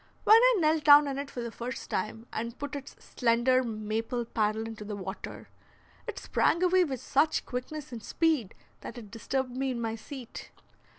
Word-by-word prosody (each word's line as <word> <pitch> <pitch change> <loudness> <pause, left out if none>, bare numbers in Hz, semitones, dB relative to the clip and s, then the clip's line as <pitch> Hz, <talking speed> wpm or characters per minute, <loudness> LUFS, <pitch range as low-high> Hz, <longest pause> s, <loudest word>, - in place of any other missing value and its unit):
When 435 - +8
I - - +6
knelt 315 -3 +2
down 290 0 +8
in 275 0 -3
it 280 0 -5
for 245 - -6
the 235 -1 -5
first 240 +1 -6
time 215 +4 -3
and 235 +2 -4
put 285 0 -5
its 280 -1 -8
slender 245 +1 +2
maple 225 +1 -3
paddle 220 -1 0
into 225 -1 -7
the 210 0 -5
water, 190 0 -7 0.6
it - - -5
sprang 340 - +1
away 365 0 +5
with 270 -7 -3
such 300 +6 +1
quickness 260 +3 -5
and 235 -2 -6
speed 310 - 0 0.2
that 240 - -9
it 215 -4 -10
disturbed 250 +3 -3
me 265 +1 -1
in 250 -2 -3
my 225 -1 -2
seat. 235 +2 -9
250 Hz, 185 wpm, -29 LUFS, 225-285 Hz, 0.6 s, When